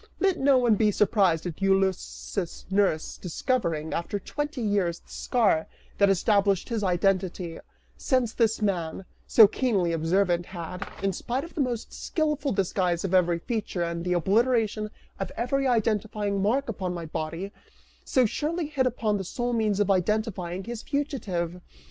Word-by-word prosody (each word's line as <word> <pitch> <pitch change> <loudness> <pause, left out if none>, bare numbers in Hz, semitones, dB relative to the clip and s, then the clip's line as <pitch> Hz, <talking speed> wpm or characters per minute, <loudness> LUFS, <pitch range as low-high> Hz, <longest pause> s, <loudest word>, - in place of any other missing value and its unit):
Let 385 -2 +2
no 275 0 +5
one 240 -3 +4
be 210 +1 +3
surprised 195 -5 +2
at 175 +1 -5
Ulysses' 195 -1 -1
nurse 190 -5 +1
discovering, 170 - -1
after 170 +4 -2
twenty 295 +5 -4
years, 195 -5 0
the - - -21
scar 205 -10 +1 0.3
that 200 -1 +5
established 200 +1 +2
his 225 -3 -1
identity, 180 -2 0 0.4
since 255 -4 +1
this 225 -2 +1
man, 185 -2 -1 0.2
so 225 - +8
keenly 200 -8 0
observant, 175 +2 +1
had, 180 +1 -6
in 195 -1 +1
spite 250 +8 -3
of 335 - -10
the 310 - -1
most 245 -4 -2
skillful 300 -3 -1
disguise 180 -3 0
of 190 -1 -2
every 175 -2 +4
feature 200 -2 -3
and 170 0 -3
the 180 0 0
obliteration 215 +3 +2 0.3
of - - -3
every 270 +3 0
identifying 210 -3 0
mark 245 +8 +1
upon 185 -5 -3
my 170 -1 -5
body, 165 +5 -4 0.5
so 255 -2 +3
surely 310 +9 -1
hit 280 -3 0
upon 220 -4 0
the 195 - -3
sole 240 +6 -2
means 215 -3 +1
of 205 -1 +3
identifying 190 -2 0
his 235 +1 -6
fugitive! 190 - -2
200 Hz, 155 wpm, -27 LUFS, 180-240 Hz, 0.5 s, so